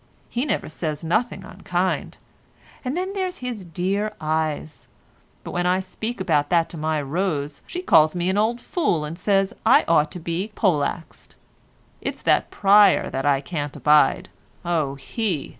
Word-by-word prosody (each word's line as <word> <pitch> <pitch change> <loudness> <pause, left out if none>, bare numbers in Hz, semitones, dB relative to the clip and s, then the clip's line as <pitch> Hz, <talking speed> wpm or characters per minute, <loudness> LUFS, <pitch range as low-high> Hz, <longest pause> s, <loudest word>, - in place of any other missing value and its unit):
He 245 +4 -1
never 225 - -1
says 155 -1 -4
nothing 215 +9 0
unkind. - - -2 0.7
And 260 +5 -2
then 375 +2 -2
there's 370 -2 -2
his 245 -5 -5
dear 195 +5 -2
eyes—but 155 -1 -5
when 175 0 0
I 180 +1 +2
speak 220 +5 -5
about 155 -6 +1
that 170 -2 +2
to - - -9
my 155 0 -1
Rose 145 -1 -2
she 360 +1 -5
calls 155 - +5
me 175 0 -1
an 190 - +1
old 230 +3 +1
fool 210 - 0
and 165 +4 -7
says 195 0 +1
I - - +5
ought 155 -2 +3
to 180 - -6
be 175 +6 -3
poleaxed. 165 -3 -1 0.7
It's - - -5
that - - +2
Pryer 200 0 +5
as 135 +1 -2
I 140 -1 +3
can't 145 -2 -4
abide. 150 0 +3 0.4
Oh 155 -5 0
he! 160 - -3
175 Hz, 160 wpm, -23 LUFS, 155-210 Hz, 0.7 s, calls